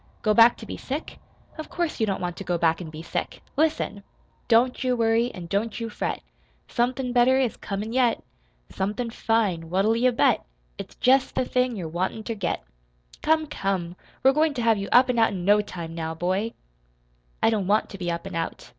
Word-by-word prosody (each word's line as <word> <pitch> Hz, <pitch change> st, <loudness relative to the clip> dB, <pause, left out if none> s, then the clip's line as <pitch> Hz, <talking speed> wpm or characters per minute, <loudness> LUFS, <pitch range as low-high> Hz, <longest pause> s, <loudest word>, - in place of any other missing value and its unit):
"Go 215 Hz, -, +3 dB
back 230 Hz, +2 st, +6 dB
to 225 Hz, -, -9 dB
be -, -, -6 dB
sick? 285 Hz, +4 st, -5 dB, 0.4 s
Of 315 Hz, -, -6 dB
course 340 Hz, -5 st, -2 dB
you 220 Hz, -, +2 dB
don't 195 Hz, -, -1 dB
want 175 Hz, -1 st, -3 dB
to -, -, -6 dB
go 175 Hz, -2 st, -1 dB
back 165 Hz, 0 st, +2 dB
an' 165 Hz, -, -7 dB
be 155 Hz, +1 st, -9 dB
sick! -, -, -4 dB
Listen! 300 Hz, -9 st, 0 dB, 0.5 s
Don't 245 Hz, +2 st, +3 dB
you 255 Hz, -1 st, +2 dB
worry, 230 Hz, +1 st, +2 dB
an' 180 Hz, -6 st, -8 dB
don't 205 Hz, +7 st, -2 dB
you 230 Hz, -1 st, -3 dB
fret. -, -, -3 dB, 0.4 s
Somethin' 250 Hz, +1 st, -1 dB
better 250 Hz, +1 st, +5 dB
is 260 Hz, -4 st, +1 dB
comin' 210 Hz, +3 st, -5 dB
yet. 245 Hz, -3 st, +2 dB, 0.5 s
Somethin' 210 Hz, +5 st, -2 dB
fine! 205 Hz, -9 st, 0 dB
What'll 195 Hz, +5 st, +2 dB
you 250 Hz, +2 st, +3 dB
bet? 235 Hz, -, +2 dB, 0.4 s
It's -, -, -8 dB
jest 265 Hz, +1 st, +3 dB
the 255 Hz, -, +1 dB
thing 250 Hz, -1 st, 0 dB
you're 180 Hz, -5 st, -4 dB
wantin' 185 Hz, +6 st, -2 dB
ter 230 Hz, -, -3 dB
get! 200 Hz, -, -2 dB, 0.6 s
Come, 315 Hz, 0 st, +2 dB
come! 195 Hz, -, -2 dB, 0.3 s
We're 265 Hz, +1 st, +6 dB
goin' 305 Hz, 0 st, +2 dB
to 240 Hz, -, -2 dB
have 225 Hz, -2 st, +3 dB
you 195 Hz, -, -4 dB
up 250 Hz, +2 st, +6 dB
an' 250 Hz, -2 st, +1 dB
out 225 Hz, -2 st, +3 dB
in 180 Hz, -2 st, -4 dB
no 205 Hz, +1 st, +5 dB
time, 170 Hz, -5 st, -7 dB
now, 160 Hz, -1 st, -4 dB
boy!" 190 Hz, +7 st, -1 dB, 0.9 s
"I -, -, +5 dB
don't 205 Hz, -4 st, 0 dB
want 210 Hz, +2 st, +2 dB
to 195 Hz, -, -9 dB
be 175 Hz, -1 st, -2 dB
up 170 Hz, +1 st, -3 dB
and 195 Hz, -2 st, -6 dB
out. 165 Hz, 0 st, -4 dB
220 Hz, 210 wpm, -25 LUFS, 185-245 Hz, 0.9 s, back